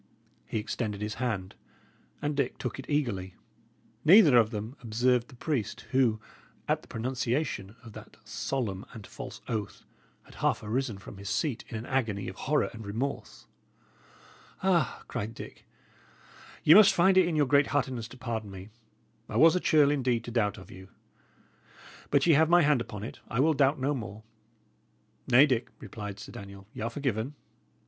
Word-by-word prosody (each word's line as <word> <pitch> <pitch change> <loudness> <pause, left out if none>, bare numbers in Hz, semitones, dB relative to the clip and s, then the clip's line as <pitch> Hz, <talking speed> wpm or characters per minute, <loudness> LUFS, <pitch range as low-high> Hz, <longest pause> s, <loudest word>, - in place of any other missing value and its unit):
He - - -3
extended 105 -1 -3
his 105 +1 -3
hand, 100 -7 -2 0.7
and 145 0 -1
Dick 140 -3 -1
took 125 +1 -5
it 135 - -9
eagerly. 110 -11 -1 0.7
Neither 165 - +7
of 115 -2 +5
them 110 +3 -5
observed 120 +1 +1
the 135 - -15
priest, 120 -6 -2
who, 125 -5 +3 0.5
at - - +1
the - - -18
pronunciation 120 -3 -2
of 115 -2 -12
that - - -12
solemn 105 -8 -3
and 110 -3 -9
false - - -9
oath, 110 -4 -4 0.4
had - - -18
half - - 0
arisen 115 0 -2
from 100 0 -11
his 100 0 -7
seat 140 -8 -1
in 115 - -4
an 110 - -6
agony 110 -7 -1
of 95 - -6
horror 150 +8 0
and 115 -1 -9
remorse. 115 +7 -4 1.2
"Ah," 175 -8 +1
cried 110 +3 -4
Dick, - - -11 1.0
"ye 155 - +8
must 200 +1 +8
find 190 +2 +4
it 185 -2 +5
in 170 - -1
your 150 -1 +3
great 140 +1 +4
heartedness 130 -5 -1
to 130 - -13
pardon 115 -4 -4
me! 95 +1 -10 0.6
I - - -2
was 165 +2 +7
a - - +2
churl, 150 -5 +4
indeed, 125 -5 0
to 120 - -7
doubt 105 -4 0
of 95 - -12
you. 95 +1 -12 1.2
But 140 -1 +3
ye 170 - +6
have 155 +2 +4
my 175 0 +6
hand 145 -4 +3
upon 105 -4 -7
it; 110 - -7
I 120 - -3
will 160 +4 +4
doubt 140 0 +2
no 135 +3 0
more." 110 -4 -6 1.0
"Nay, 130 +3 +7
Dick," 125 -5 -1
replied 105 -1 -7
Sir - - -9
Daniel, 100 -1 -10
"y' - - -7
are 115 - -1
forgiven. 135 -1 -2
120 Hz, 175 wpm, -29 LUFS, 105-145 Hz, 1.2 s, ye